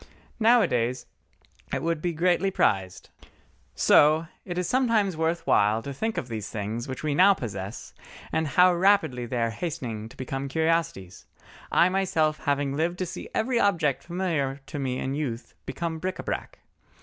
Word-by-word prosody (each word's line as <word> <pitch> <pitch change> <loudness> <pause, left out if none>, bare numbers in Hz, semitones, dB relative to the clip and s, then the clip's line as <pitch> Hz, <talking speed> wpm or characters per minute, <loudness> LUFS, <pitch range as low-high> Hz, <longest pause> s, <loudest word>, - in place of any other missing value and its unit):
Nowadays 130 - +3 0.7
it - - -2
would 165 -2 -1
be 175 - 0
greatly 175 +3 +2
prized. 95 - 0 0.6
So 155 +2 +5 0.2
it 175 -2 -5
is 180 -1 -1
sometimes 230 -8 +2
worth 165 +1 -1
while 105 +2 +3
to 140 - -5
think 220 +11 -3
of 125 - -3
these 110 -3 -5
things 110 +3 -4
which 130 +1 -6
we 150 -1 0
now 195 +6 +6
possess, 100 - -6 0.4
and 160 -1 0
how 180 +5 +5
rapidly 175 -10 +2
they 125 - -3
are 115 -1 +1
hastening 115 -8 -5
to - - -16
become 135 +1 -4
curiosities—I 160 - -1
myself 165 -5 0
having 145 -1 0
lived 170 +4 -1
to 185 - -2
see - - -7
every 235 +1 +1
object 165 - +2
familiar 165 -7 -2
to 145 - -6
me 130 -2 -2
in 130 +1 -3
youth 125 -5 -4
become 160 +4 -3
bric 185 +2 -3
à - - -8
brac. - - -4
155 Hz, 160 wpm, -26 LUFS, 125-180 Hz, 0.7 s, now